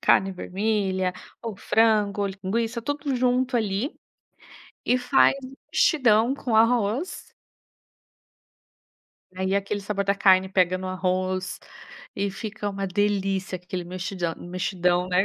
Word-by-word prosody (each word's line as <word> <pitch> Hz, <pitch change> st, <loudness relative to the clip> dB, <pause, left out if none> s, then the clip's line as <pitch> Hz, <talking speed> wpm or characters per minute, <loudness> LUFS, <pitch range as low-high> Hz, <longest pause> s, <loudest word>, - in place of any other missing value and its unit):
Carne 195 Hz, +1 st, +4 dB
vermelha 190 Hz, -1 st, -1 dB, 0.3 s
ou 225 Hz, -4 st, -5 dB
frango 210 Hz, -2 st, +2 dB
ou 200 Hz, -, 0 dB
linguiça, 220 Hz, +5 st, -2 dB
tudo 285 Hz, +2 st, -2 dB
junto 250 Hz, 0 st, +1 dB
ali, 220 Hz, -, -1 dB, 0.9 s
e 250 Hz, -, +3 dB
faz 260 Hz, +2 st, +4 dB
um 260 Hz, +1 st, -9 dB, 0.2 s
mexidão 240 Hz, -4 st, +4 dB
com 250 Hz, -5 st, -2 dB
arroz. 230 Hz, -, +1 dB, 2.0 s
Aí 190 Hz, +1 st, -1 dB
aquele 200 Hz, +1 st, -1 dB
sabor 200 Hz, 0 st, -2 dB
da 200 Hz, +1 st, +2 dB
carne 190 Hz, -1 st, +4 dB
pega 185 Hz, -1 st, +2 dB
no 185 Hz, 0 st, -6 dB
arroz 185 Hz, 0 st, -1 dB, 0.6 s
e 200 Hz, 0 st, -1 dB
fica 205 Hz, +1 st, -5 dB
uma 195 Hz, -1 st, -3 dB
delícia 195 Hz, -1 st, 0 dB
aquele 180 Hz, 0 st, -6 dB
mexidão 180 Hz, -1 st, -3 dB
mexidão, 180 Hz, 0 st, -1 dB
né. 180 Hz, +2 st, +3 dB
200 Hz, 120 wpm, -25 LUFS, 185-225 Hz, 2.0 s, Carne